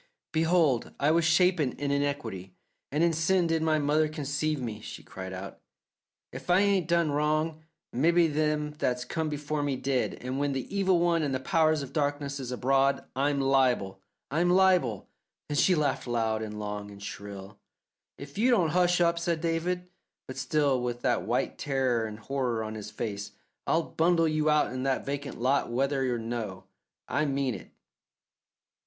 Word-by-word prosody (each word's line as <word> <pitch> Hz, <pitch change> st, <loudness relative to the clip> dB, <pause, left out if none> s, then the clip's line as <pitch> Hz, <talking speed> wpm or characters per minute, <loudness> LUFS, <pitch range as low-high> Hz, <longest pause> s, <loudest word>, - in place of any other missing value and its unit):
"Behold, 160 Hz, -5 st, +2 dB
I 145 Hz, +2 st, +3 dB
was 165 Hz, 0 st, +3 dB
shapen 165 Hz, -4 st, +3 dB
in 140 Hz, 0 st, -3 dB
iniquity; 140 Hz, -11 st, -2 dB, 0.4 s
and 150 Hz, +4 st, +1 dB
in 170 Hz, -1 st, +3 dB
sin 170 Hz, +3 st, +2 dB
did 165 Hz, -1 st, +1 dB
my 160 Hz, -1 st, +2 dB
mother 150 Hz, +1 st, +2 dB
conceive 150 Hz, 0 st, -2 dB
me," 115 Hz, -4 st, -4 dB
she -, -, -9 dB
cried 95 Hz, 0 st, -8 dB
out. 95 Hz, +1 st, -7 dB, 0.7 s
"If -, -, -9 dB
I 180 Hz, +2 st, +5 dB
ain't 200 Hz, -4 st, +2 dB
done 170 Hz, -3 st, +2 dB
wrong, 155 Hz, +2 st, 0 dB, 0.3 s
mebbe 165 Hz, +4 st, +3 dB
them 150 Hz, 0 st, 0 dB
that's 125 Hz, -1 st, 0 dB
come 160 Hz, -1 st, -2 dB
before 150 Hz, 0 st, -3 dB
me 145 Hz, -2 st, 0 dB
did, 130 Hz, 0 st, -1 dB
and 130 Hz, +2 st, -4 dB
when 145 Hz, -1 st, 0 dB
the 135 Hz, +9 st, -4 dB
Evil 190 Hz, -2 st, +3 dB
One 170 Hz, -1 st, +2 dB
and 140 Hz, -3 st, -1 dB
the -, -, -1 dB
Powers 155 Hz, 0 st, +2 dB
of 135 Hz, 0 st, -9 dB
Darkness 145 Hz, -1 st, -1 dB
is 130 Hz, -2 st, -5 dB
abroad 135 Hz, +2 st, +2 dB
I'm 140 Hz, +1 st, +1 dB
liable, 125 Hz, -8 st, +2 dB, 0.3 s
I'm 170 Hz, +4 st, +2 dB
liable!" 180 Hz, -, +3 dB, 0.4 s
Then 145 Hz, -, -1 dB
she 185 Hz, -, +4 dB
laughed 145 Hz, -4 st, 0 dB
loud 110 Hz, -2 st, 0 dB
and 105 Hz, -1 st, -5 dB
long 105 Hz, -1 st, -5 dB
and 100 Hz, 0 st, -11 dB
shrill. 100 Hz, 0 st, -8 dB, 0.6 s
"If 140 Hz, +7 st, -9 dB
you 245 Hz, +4 st, +4 dB
don't 185 Hz, -10 st, +3 dB
hush 180 Hz, +2 st, +3 dB
up," 170 Hz, 0 st, +3 dB
said 170 Hz, -1 st, -1 dB
David, 170 Hz, +2 st, -1 dB, 0.4 s
but 130 Hz, -, -8 dB
still 135 Hz, -1 st, +1 dB
with 120 Hz, 0 st, -3 dB
that -, -, +1 dB
white -, -, -1 dB
terror 130 Hz, -5 st, 0 dB
and 105 Hz, -1 st, -8 dB
horror 120 Hz, -1 st, -2 dB
on 110 Hz, 0 st, -5 dB
his 105 Hz, -1 st, -7 dB
own 110 Hz, -, -19 dB
face, 105 Hz, -2 st, -4 dB, 0.3 s
"I'll 165 Hz, +1 st, +2 dB
bundle 165 Hz, 0 st, +2 dB
you 155 Hz, 0 st, +1 dB
out 150 Hz, -4 st, +2 dB
in 130 Hz, -, -3 dB
that 135 Hz, 0 st, 0 dB
vacant 140 Hz, 0 st, -4 dB
lot 130 Hz, +3 st, +1 dB
whether 135 Hz, +1 st, 0 dB
or 120 Hz, -, 0 dB
no. 115 Hz, -5 st, -4 dB, 0.4 s
I 145 Hz, +3 st, 0 dB
mean 135 Hz, -3 st, 0 dB
it." -, -, -9 dB
145 Hz, 180 wpm, -28 LUFS, 125-160 Hz, 0.7 s, I